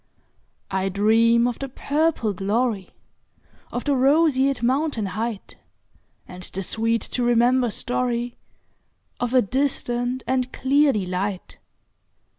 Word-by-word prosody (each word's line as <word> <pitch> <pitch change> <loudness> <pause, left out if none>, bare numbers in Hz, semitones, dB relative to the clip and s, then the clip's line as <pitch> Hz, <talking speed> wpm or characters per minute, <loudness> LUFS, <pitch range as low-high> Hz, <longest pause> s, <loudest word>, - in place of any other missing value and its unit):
I 190 0 0
dream 225 +4 +3
of 245 - -4
the 275 - -5
purple 285 -5 0
gloryOf 205 +1 -1 1.0
the 285 -1 +2
roseate 275 -2 +3
mountain 260 -2 0
heightAnd 200 -3 -9
the 195 - -3
sweet 225 +4 0
to 250 - -4
remember 240 +1 +3
storyOf 245 +1 -2 1.0
a 255 -1 +4
distant 245 +1 -1
and 255 0 -1
clear 280 +2 +3
delight. 190 -2 -3
240 Hz, 95 wpm, -23 LUFS, 215-260 Hz, 1.0 s, a